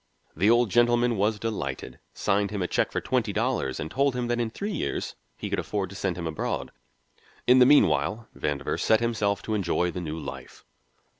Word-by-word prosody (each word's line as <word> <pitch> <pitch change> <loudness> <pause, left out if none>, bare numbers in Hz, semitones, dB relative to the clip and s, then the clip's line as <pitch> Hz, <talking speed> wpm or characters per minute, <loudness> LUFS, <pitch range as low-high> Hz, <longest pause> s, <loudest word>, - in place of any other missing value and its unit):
The 95 +7 +3
Old 120 -2 +4
Gentleman 120 +1 +3
was 105 +2 +1
delighted, 110 0 -4 0.2
signed 100 +1 +1
him 100 -3 -2
a - - -1
check - - 0
for - - -1
twenty - - 0
dollars, 65 -1 -1
and 80 - -5
told 140 -1 +1
him 120 -1 -2
that 120 0 0
in 115 -2 0
three 200 - -4
years 185 - -3 0.2
he - - -5
could - - -1
afford 100 -3 -3
to - - -9
send 95 -3 -2
him 85 - -4
abroad. 80 -1 -3 0.7
In 125 +1 +6
the 125 - +7
meanwhile 105 - +3
Vandover 70 -1 -2
set 110 - +3
himself 105 -4 0
to 110 - -3
enjoy 90 -3 0
the 90 - -5
new 80 -2 -4
life. 80 - -9
105 Hz, 200 wpm, -26 LUFS, 90-120 Hz, 0.7 s, the